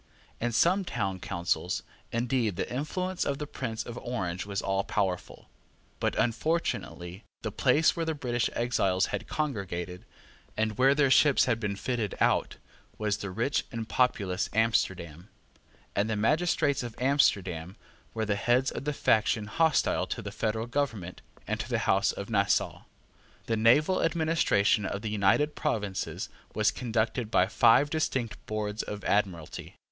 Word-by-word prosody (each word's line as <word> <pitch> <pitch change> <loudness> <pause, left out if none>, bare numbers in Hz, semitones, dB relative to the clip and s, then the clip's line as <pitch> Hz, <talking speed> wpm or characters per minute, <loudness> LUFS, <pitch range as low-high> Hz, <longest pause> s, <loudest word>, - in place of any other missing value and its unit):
In 120 +1 -1
some 180 - +3
town 95 - -2
councils, 85 0 -2 0.3
indeed, 115 -3 0
the - - -2
influence 180 +7 -2
of 140 - -1
the 150 - -4
Prince 120 -6 -4
of 120 0 -6
Orange 95 -7 -3
was 100 -1 -2
all 95 0 0
powerful. 95 -3 -2 0.5
But - - 0
unfortunately 115 - -1 0.2
the 110 - -2
place 140 +8 +3
where 170 - -1
the 160 -1 -1
British 120 -4 -1
exiles 100 -6 +1
had - - -3
congregated, 95 - -3 0.5
and 110 0 0
where 135 +2 +5
their 140 -3 +3
ships 145 0 +5
had 115 -3 +1
been 105 -3 -2
fitted 115 -1 -2
out, - - +2 0.4
was 105 -1 0
the 100 - -5
rich 115 +9 0
and 115 -3 -4
populous 100 -8 +1
Amsterdam; 95 -6 0 0.7
and 105 +2 +1
the 110 - 0
magistrates 145 +5 +2
of 120 -2 -6
Amsterdam 95 - +1 0.4
were 110 -1 -1
the 105 -1 0
heads 120 +6 +2
of - - -6
the 150 - 0
faction 110 -4 +2
hostile 160 +8 +2
to - - -4
the - - -5
federal 110 +1 -1
government 120 -9 -3 0.2
and - - -2
to - - -4
the - - +1
House - - +3
of - - -6
Nassau. - - +1 0.6
The 115 - 0
naval 125 +11 +4
administration 155 -11 +2
of 100 +1 -3
the 110 - -2
United 105 +9 +2
Provinces 105 -10 -2 0.3
was 110 -1 +3
conducted 115 -1 -1
by 90 - +4
five 115 +8 +4
distinct 130 -7 -2
boards 105 0 -2
of 105 -1 -6
Admiralty. 95 -6 -1
110 Hz, 150 wpm, -29 LUFS, 100-135 Hz, 0.7 s, where